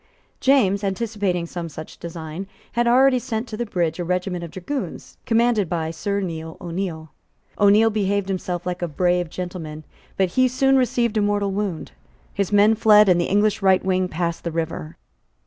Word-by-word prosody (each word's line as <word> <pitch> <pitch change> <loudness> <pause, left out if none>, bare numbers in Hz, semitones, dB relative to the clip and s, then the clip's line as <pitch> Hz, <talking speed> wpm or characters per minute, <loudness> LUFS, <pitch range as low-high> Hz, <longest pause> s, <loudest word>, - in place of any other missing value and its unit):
James, 210 -8 +3
anticipating 200 -3 -1
some 170 0 -6
such 155 +1 -10
design, 165 +2 -7 0.2
had 240 0 +1
already 255 +1 +5
sent 240 -1 -4
to 215 - -6
the 240 +1 -3
bridge 175 -4 -1
a - - -1
regiment 180 0 -2
of 170 - -6
dragoons, 190 - -6
commanded 230 -5 +2
by 160 -2 -2
Sir 200 +5 -2
Neil 160 -3 -5
O'Neil. 170 -3 -5 0.5
O'Neil 210 +2 +5
behaved 200 -2 0
himself 180 -2 -3
like 180 0 -3
a 175 - 0
brave 175 +2 0
gentleman: 165 -4 -6 0.3
but 190 -1 +2
he 255 +8 +3
soon 270 +2 +2
received 240 -3 +1
a - - +3
mortal 205 -1 0
wound; 195 -4 -3 0.4
his 200 -1 -1
men 205 +2 +5
fled; 210 -1 +6
and 175 -1 +4
the - - 0
English 205 +2 +1
right 190 -1 +3
wing 185 -1 +1
passed 170 -1 -3
the 170 - -2
river. 160 - -4
190 Hz, 175 wpm, -22 LUFS, 170-215 Hz, 0.5 s, fled